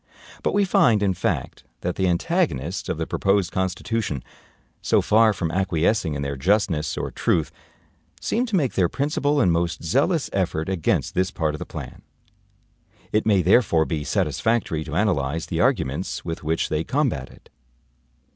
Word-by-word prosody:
But - - 0
we 205 -1 +3
find, 115 - +3
in 95 -2 +2
fact, - - -3 0.2
that 90 0 -2
the 95 - +1
antagonists 90 - -1
of - - -1
the - - -2
proposed 95 -2 +1
Constitution, 95 - -2 0.6
so - - +3
far 110 +1 +4
from 90 -5 -2
acquiescing 90 -2 +1
in 70 - -3
their 70 0 -3
justness 80 -1 +1
or - - -3
truth, - - 0 0.7
seem 245 +3 -1
to 220 - -1
make 145 -9 +1
their 90 -3 +2
principal 145 - 0
and 90 -10 +4
most 85 0 -1
zealous 155 - +1
effort 90 -3 -1
against 95 -5 0
this 95 0 +1
part 80 -5 -1
of 75 - -6
the - - -6
plan. - - -8 1.1
It 110 +1 +1
may 100 -4 +4
therefore 90 -4 +4
be 80 -3 -3
satisfactory 110 -4 0
to - - -6
analyze 80 -5 0
the - - -2
arguments 65 +2 0
with 80 -1 -5
which 80 +2 0
they 80 +1 0
combat 125 - -1
it. - - -19
95 Hz, 165 wpm, -23 LUFS, 80-110 Hz, 1.1 s, far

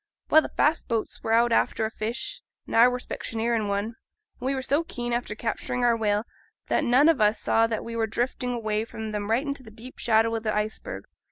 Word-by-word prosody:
Well, 315 - +8
the - - -5
fast 310 +3 +1
boats 230 -3 -2
were 225 - -2
out 235 +1 +4
after 225 -1 +2
a 220 - -3
fish, 240 - -4 0.2
and - - -5
I 230 +2 +8
were 250 0 0
specksioneer 230 -1 -2
in 215 -2 0
one; 200 0 0
and 225 +2 -7 0.4
we 265 +2 -1
were 260 - -3
so 285 +5 +1
keen 240 -6 -4
after 240 -3 -2
capturing 240 +2 -2
our 235 -1 +4
whale, 210 -2 +1 0.5
that - - +2
none 265 +3 +5
on 320 -8 +4
us - - +7
ever 210 0 +5
saw 225 +1 +2
that 225 -1 -3
we 230 0 -6
were 225 -1 0
drifting 245 +3 -2
away 215 -3 -1
from 220 -1 -6
them 210 0 -3
right 240 +6 +2
into 280 -1 -4
deep 230 +4 -12
shadow 225 0 +3
o' - - 0
th' 220 - -7
iceberg. 215 - -2
230 Hz, 235 wpm, -26 LUFS, 220-250 Hz, 0.5 s, Well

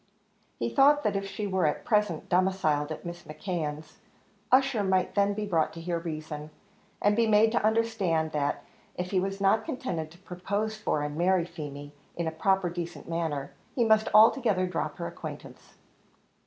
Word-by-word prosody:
He 115 - -1
thought 290 - +4
that 210 -2 0
if 195 0 -2
she 195 +2 -4
were 190 -4 +1
at 150 - -2
present 210 -7 +1
domiciled 175 -5 +1
at 155 - -6
Mrs. 175 0 -8
McKeon's, 155 -2 -5 0.5
Ussher 260 -4 +4
might 190 -1 +1
then 200 0 +2
be 210 0 -2
brought 165 -6 +1
to 165 - -8
hear 170 0 -2
reason, 155 -2 -6 0.5
and 205 0 +3
be 230 0 +3
made 220 +1 +5
to 235 - 0
understand 215 -8 +1
that 145 -1 -1 0.3
if 180 0 -4
he 190 - +2
was 195 +1 -3
not 200 +3 +3
contented 180 - -4
to 170 - -17
propose 200 +4 -3
for 185 -8 -1
and 145 0 -4
marry 180 0 +2
Feemy, 145 -3 -8 0.2
in 170 - -2
a 160 - -1
proper 190 +3 +1
decent 175 0 -6
manner, 160 -4 -2 0.2
he 240 - +2
must 220 0 +4
altogether 215 -3 +5
drop 180 -2 -3
her - - -4
acquaintance. - - -9
185 Hz, 175 wpm, -28 LUFS, 160-210 Hz, 0.5 s, made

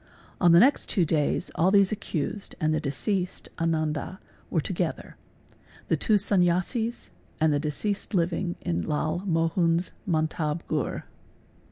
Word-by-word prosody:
On 175 -2 +5
the 170 - +8
next 270 +7 +4
two 180 -5 +2
days 150 -2 0
all 175 +3 +3
these 200 0 +5
accused 200 -2 -4
and 155 0 +1
the 155 - +1
deceased 180 +6 -2
Ananda 160 +2 -1 0.3
were, - - +1
_ - - -2
together: - - -3 0.7
the - - +3
two 215 - +2
Sanyasis 200 +4 +1 0.3
and 155 -1 +3
the 145 - +1
deceased 195 +8 -3
living 175 0 0
in 85 0 -1
Lal 155 - -1
Mohun's 165 +1 +1
a 200 - -13
mantab 155 -1 0
ghur. - - -2
170 Hz, 145 wpm, -26 LUFS, 155-190 Hz, 0.7 s, the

